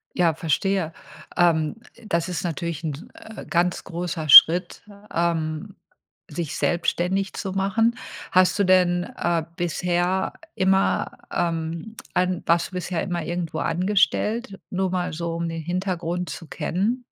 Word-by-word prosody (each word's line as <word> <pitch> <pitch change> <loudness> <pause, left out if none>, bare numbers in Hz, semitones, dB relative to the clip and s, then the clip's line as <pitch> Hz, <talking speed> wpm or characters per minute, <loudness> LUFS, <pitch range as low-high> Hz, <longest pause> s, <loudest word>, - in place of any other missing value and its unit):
Ja, 170 -2 +3
verstehe. 165 +2 0 0.5
Ähm, 160 -4 +3 0.3
das 170 0 0
ist 180 - -3
natürlich 170 -2 -3
'n, 150 -1 -5
äh, 220 - -11
ganz 175 0 0
großer 170 -3 -4
Schritt, 170 +6 +8 0.3
ähm, 170 +3 -1 0.5
sich 160 -2 -4
selbstständig 180 +3 0
zu 190 -3 -4
machen. 220 +5 +1 0.4
Hast 185 0 +4
du 200 - +4
denn, 180 -1 +3
äh, 170 -2 -1
bisher 175 +2 0 0.2
immer, 190 +1 +2 0.2
ähm, 165 +4 -2 0.2
an 180 0 0
warst 170 0 +2
du - - -22
bisher 180 -2 -2
immer 175 -3 -3
irgendwo 170 -1 -3
angestellt, 200 +4 0
nur 190 -1 -1
mal 180 -1 -1
so 170 +1 -3
um 170 0 -2
den 165 0 -4
Hintergrund 180 0 -2
zu 165 - -8
kennen? 195 - -2
175 Hz, 135 wpm, -24 LUFS, 165-190 Hz, 0.5 s, Schritt